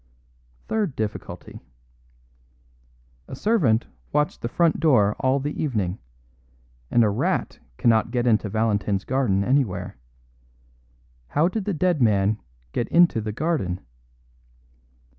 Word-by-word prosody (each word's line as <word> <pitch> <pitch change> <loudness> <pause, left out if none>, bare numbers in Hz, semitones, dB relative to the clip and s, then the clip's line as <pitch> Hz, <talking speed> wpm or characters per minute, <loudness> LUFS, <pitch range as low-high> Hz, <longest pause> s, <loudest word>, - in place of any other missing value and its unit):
Third 210 -10 -1
difficulty: 110 -1 -6 1.7
A - - -7
servant 135 - +2 0.3
watched 150 0 0
the 115 - -3
front 170 +4 +2
door 110 -10 +3
all 130 +1 +2
the 145 +2 -4
evening; 105 - -1 0.9
and 120 - +4
a 105 - +3
rat 100 - -1 0.2
cannot 115 -1 +3
get 120 0 -1
into 110 -3 +2
Valentin's 105 -2 0
garden 120 -7 +1
anywhere. 100 - 0 1.3
How 150 - +2
did 195 +2 -3
the 205 - -1
dead 175 -2 +1
man 105 -1 +2 0.3
get 120 - -2
into 170 -9 +4
the 105 0 -3
garden? 115 - -1
120 Hz, 115 wpm, -24 LUFS, 105-150 Hz, 1.7 s, and